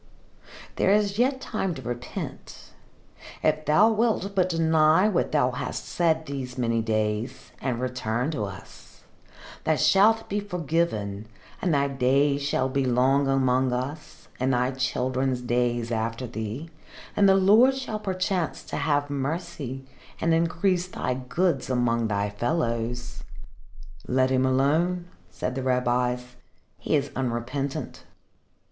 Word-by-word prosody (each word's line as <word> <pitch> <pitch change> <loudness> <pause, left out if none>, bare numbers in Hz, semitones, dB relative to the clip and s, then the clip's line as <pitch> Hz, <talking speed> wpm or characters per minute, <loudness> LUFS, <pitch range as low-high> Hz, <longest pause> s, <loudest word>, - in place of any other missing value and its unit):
"There - - +2
is 205 0 +2
yet 260 +2 +2
time 190 -8 -2
to 135 - -7
repent. 120 +1 -7 0.7
If 155 0 +1
thou 200 +9 +5
wilt 220 -3 0
but 185 -2 +2
deny 160 +2 +4
what 195 -5 0
thou 135 -4 +2
hast 125 0 -4
said 160 -2 +1
these 135 -3 -6
many 115 -2 +1
days, 110 +3 -2
and 125 -3 -1
return 125 +1 -2
to 110 -9 -2
us, 100 -2 -12 0.6
thou 160 - +2
shalt 200 +9 +4
be 205 - -1
forgiven 160 - -2 0.3
and 180 - +1
thy 140 -2 +2
days 140 +2 +2
shall 140 -2 0
be 135 +1 0
long 130 +2 +3
among 130 -1 +2
us, 130 +5 -5
and 130 +1 +1
thy 125 +1 +1
children's 130 0 -1
days 120 -1 0
after 115 +2 -2
thee, 115 +7 -5 0.4
and 200 -1 +5
the 190 - +6
Lord 215 +8 +5
shall 240 -5 -4
perchance 185 -4 -2
have 145 -2 0
mercy 140 -2 -4 0.3
and 165 0 +2
increase 175 +2 +1
thy 125 - -2
goods 135 +4 -1
among 115 -2 +1
thy 100 -1 -1
fellows." 120 -1 -2 0.8
"Let 130 +1 +2
him 130 0 +3
alone," 165 +7 +1 0.2
said 95 +7 -4
the 130 - -3
rabbis. 125 -1 0 0.4
"He - - 0
is - - 0
unrepentant." 130 +2 -3
135 Hz, 130 wpm, -26 LUFS, 125-170 Hz, 0.8 s, the